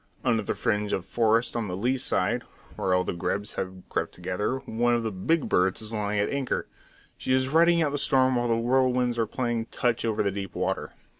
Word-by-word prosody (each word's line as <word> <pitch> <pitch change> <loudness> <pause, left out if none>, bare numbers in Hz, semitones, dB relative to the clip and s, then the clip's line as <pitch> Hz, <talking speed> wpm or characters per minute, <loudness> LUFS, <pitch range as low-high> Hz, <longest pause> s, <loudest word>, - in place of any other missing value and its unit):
Under 115 -3 +3
the 105 - -2
fringe 105 -3 0
of 95 - -1
forest 115 +2 +1
on 115 -3 -1
the 90 -1 -4
lee 125 +6 +1
side, 130 - 0 0.3
where 95 -1 +1
all 90 - +2
the - - -3
grebes 100 +4 -2
have 95 -1 -5
crept - - -2
together, 95 +8 -2
one 120 0 +1
of 120 - -1
the 110 - -2
"big 140 - 0
birds" 90 +1 +2
is 110 0 -6
lying 105 -1 -1
at 100 - +2
anchor. 140 -2 -1 0.5
She 130 - -1
is 130 0 +2
riding 170 +2 +5
out 150 - 0
the 145 - -1
storm 130 -2 +3
while 120 0 +1
the 115 - +2
whirlwinds 125 0 +2
are 115 - +1
playing 120 -1 -2
touch 120 0 0
over 110 -2 +1
the 100 - +1
deep 95 -1 -6
water. - - -2
115 Hz, 220 wpm, -27 LUFS, 100-130 Hz, 0.5 s, riding